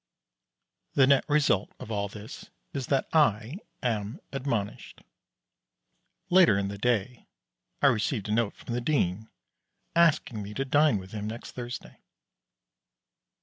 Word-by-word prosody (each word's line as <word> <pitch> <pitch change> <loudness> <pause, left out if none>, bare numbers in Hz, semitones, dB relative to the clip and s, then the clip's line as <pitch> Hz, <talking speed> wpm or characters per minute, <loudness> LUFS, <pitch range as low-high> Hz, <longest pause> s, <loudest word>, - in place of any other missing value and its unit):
The 135 - +6
net 140 0 +4
result 145 -10 +2
of 115 - -8
all 100 -1 -1
this 105 +2 -10 0.2
is 135 -3 -3
that 135 -2 +1
I 135 - +2 0.2
am 110 - -2
admonished. 120 -7 -3 1.3
Later 175 - +6
in 100 0 -1
the 100 - -6
Day 120 +1 -1 0.6
I - - +6
received 115 -4 +2
a - - -3
note 115 -2 +1
from 120 - -7
the 120 - -1
Dean 110 - 0 0.7
asking 155 -9 +3
me 105 +1 -7
to 135 - -1
dine 145 -3 +4
with 95 0 -9
him 105 -1 -4
next 115 +2 -7
Thursday. 120 -1 -7
115 Hz, 135 wpm, -28 LUFS, 105-140 Hz, 1.3 s, The